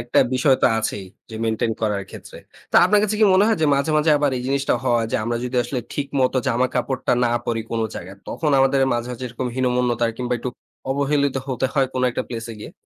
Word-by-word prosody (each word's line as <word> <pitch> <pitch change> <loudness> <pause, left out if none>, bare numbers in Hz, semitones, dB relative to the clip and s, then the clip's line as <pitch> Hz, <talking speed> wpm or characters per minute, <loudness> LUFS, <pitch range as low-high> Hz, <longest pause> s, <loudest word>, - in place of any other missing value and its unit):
একটা 120 +1 0 0.2
বিষয় 130 +1 +3
তো - - +7
আছেই 105 -3 -3 0.2
যে - - -8
মেইনটেইন 110 0 0
করার 105 -2 0
ক্ষেত্রে। - - -11 0.3
তো - - +4
আপনার 210 0 +4
কাছে 215 0 0
কি - - +7
মনে 190 +2 +5
হয় 225 - +1
যে - - +4
মাঝে, 140 +3 0
মাঝে 155 +1 +3
আবার 145 -1 +2
এই 125 - -5
জিনিসটা 140 +1 +1
হয় 120 -3 +2
যে - - +1
আমরা 120 +1 -1
যদি 125 0 -3
আসলে 125 +1 -3
ঠিক 145 - -2
মতো 130 +1 +2
জামা 125 +1 +2
কাপড়টা 130 +1 -1
না 120 - +1
পড়ি 115 -1 -1
কোনো 115 -1 -1
জায়গায়, 95 +3 -8
তখন 155 - -1
আমাদের 135 +1 +3 0.2
মাঝে, 120 0 -3
মাঝে 125 +1 -7
এরকম 125 +2 -4
হীনমন্যতার 125 -2 +1
কিংবা 125 -1 -3
একটু 125 - -4 0.4
অবহেলিত 140 0 +1
হতে 130 0 0
হয় 135 -2 +3
কোনো 130 0 0
একটা - - -2
প্লেস 115 -1 -5
এ - - -9
গিয়ে? 105 - -9
125 Hz, 230 wpm, -22 LUFS, 120-140 Hz, 0.4 s, তো